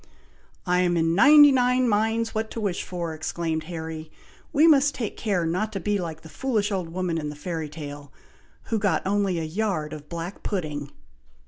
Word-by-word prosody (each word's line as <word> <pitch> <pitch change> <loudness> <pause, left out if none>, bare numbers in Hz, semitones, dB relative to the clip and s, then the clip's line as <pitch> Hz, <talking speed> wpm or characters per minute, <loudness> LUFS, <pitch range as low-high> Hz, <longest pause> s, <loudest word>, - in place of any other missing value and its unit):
"I 180 0 +2
am 175 -1 +2
in 165 0 +2
ninety 290 - +8
nine 250 -1 +3
minds 225 +1 +1
what 220 0 -2
to - - -6
wish 200 -5 -1
for," 170 -3 -4
exclaimed 160 0 -3
Harry; 160 -2 -6 0.4
"we 300 +3 +4
must 290 -3 +5
take 225 -5 -4
care 195 -6 0
not 185 +7 -1
to 195 - -2
be 205 +2 0
like 160 -3 -5
the - - -12
foolish 215 0 -1
old 185 -4 -2
woman 175 -1 -2
in 150 -1 -4
the 150 - -7
fairy 160 0 -4
tale, 145 -2 -8 0.5
who 225 - -1
got 195 -6 0
only 195 -2 +1
a 165 - -2
yard 160 -3 -2
of 150 -1 -10
black 170 +3 -6
pudding." 150 -8 -3
180 Hz, 190 wpm, -25 LUFS, 160-215 Hz, 0.5 s, ninety